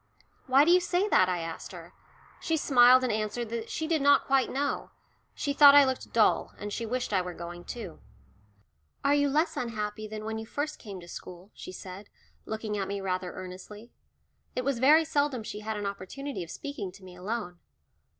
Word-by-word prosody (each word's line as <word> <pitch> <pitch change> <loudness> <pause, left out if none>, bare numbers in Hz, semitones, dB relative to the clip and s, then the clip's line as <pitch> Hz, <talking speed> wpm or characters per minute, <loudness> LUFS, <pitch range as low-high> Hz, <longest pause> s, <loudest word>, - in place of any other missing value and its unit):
"Why 270 +3 +6
do 340 - +4
you 360 - +7
say 360 +2 0
that?" 185 - +4
I 180 -2 -1
asked 165 0 -7
her. - - -11 0.5
She 325 - 0
smiled 255 -3 +6
and 245 -4 0
answered 215 +2 -2
that 230 0 -4
she 315 - -3
did 315 -2 +1
not 285 0 +5
quite 270 -1 +2
know; 285 +2 -2 0.5
she 285 - -2
thought 285 0 +9
I 285 -1 +8
looked 260 -1 -3
dull, 225 -2 +2
and 205 0 -6
she 230 - -3
wished 245 -1 -2
I 190 - +3
were 180 -1 -6
going 175 +1 -8
too. 215 -9 -7 1.1
"Are 280 - +4
you 285 0 +3
less 310 +5 +1
unhappy 215 -2 -4
than 215 0 -7
when 220 0 -3
you 220 - -6
first 295 +5 -4
came 200 -5 -8
to 170 - -13
school?" 180 +2 -10
she - - -9
said, 185 +2 -9 0.4
looking 220 -1 -3
at 195 - -2
me 200 0 -3
rather 185 -2 -2
earnestly. 190 +5 -10 0.6
It 250 - -2
was 275 -4 0
very 305 +5 +6
seldom 285 -6 0
she 210 - -6
had 215 0 -4
an 205 - -4
opportunity 200 +6 -5
of 165 - -11
speaking 280 - -6
to 195 - -15
me 180 -1 -12
alone. 180 -1 -5
220 Hz, 200 wpm, -28 LUFS, 195-280 Hz, 1.1 s, thought